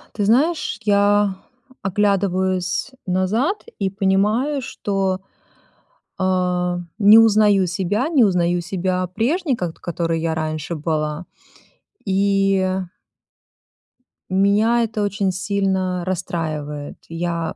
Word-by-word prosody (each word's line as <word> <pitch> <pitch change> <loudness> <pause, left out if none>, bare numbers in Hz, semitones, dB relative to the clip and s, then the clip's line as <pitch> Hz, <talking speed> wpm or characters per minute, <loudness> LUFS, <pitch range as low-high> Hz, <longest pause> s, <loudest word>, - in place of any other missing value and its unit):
Ты 205 - 0
знаешь, 285 +7 +2
я 205 -1 +3 0.5
оглядываюсь 190 +1 0 0.2
назад 215 - 0 0.2
и 195 -2 0
понимаю, 210 +9 +1
что, 195 -5 -2 1.0
а, 180 -1 0 0.2
не 210 +1 +8
узнаю 210 -3 +5
себя, 190 - -1
не 300 -7 +4
узнаю 175 -3 +2
себя 185 +1 -2
прежней, 265 - 0
ко 180 -6 -3
которой 165 -1 -3
я 160 -1 -1
раньше 155 +1 -3
была. 155 +1 -2 0.8
И, 195 0 +2
э 185 0 0 1.5
меня 205 +5 +3
это 220 -1 -3
очень 200 -1 0
сильно 185 -1 -1
расстраивает. 155 -5 -4
Я 165 -1 -3
190 Hz, 100 wpm, -20 LUFS, 175-205 Hz, 1.5 s, не